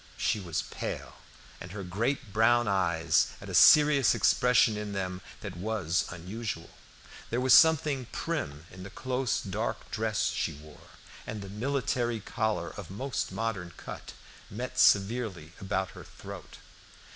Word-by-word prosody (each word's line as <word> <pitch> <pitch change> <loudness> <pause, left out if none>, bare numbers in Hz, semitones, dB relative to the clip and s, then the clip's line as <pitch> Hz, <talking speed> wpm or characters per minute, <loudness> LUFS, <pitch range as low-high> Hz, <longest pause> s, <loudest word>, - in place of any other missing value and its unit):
She 110 - 0
was 85 -8 -3
pale, - - -6 0.4
and 85 +1 -9
her 100 -2 -5
great 110 +5 -2
brown 120 +2 +4
eyes 85 -4 +2
had - - -10
a - - -6
serious 145 -7 +7
expression 125 -3 +4
in 105 -1 -5
them 95 -1 -3 0.2
that 100 -4 -6
was 90 -3 -1
unusual. 90 0 -6 0.6
There 120 - 0
was 130 -1 +4
something 150 -5 +5
prim 70 +3 -4
in 90 - -11
the 95 - -8
close 130 +1 -1
dark - - -4
dress 110 -1 0
she - - -2
wore, 75 +1 -15 0.4
and 105 -2 -5
the 100 - -8
military 120 +1 -1
collar 105 -4 -2
of 100 -6 -9
most 125 +7 -3
modern 100 -7 -3
cut - - -8 0.4
met 125 +5 -5
severely 100 -6 +3
about 95 -1 -2
her - - -11
throat. - - -11
105 Hz, 145 wpm, -29 LUFS, 90-120 Hz, 0.6 s, serious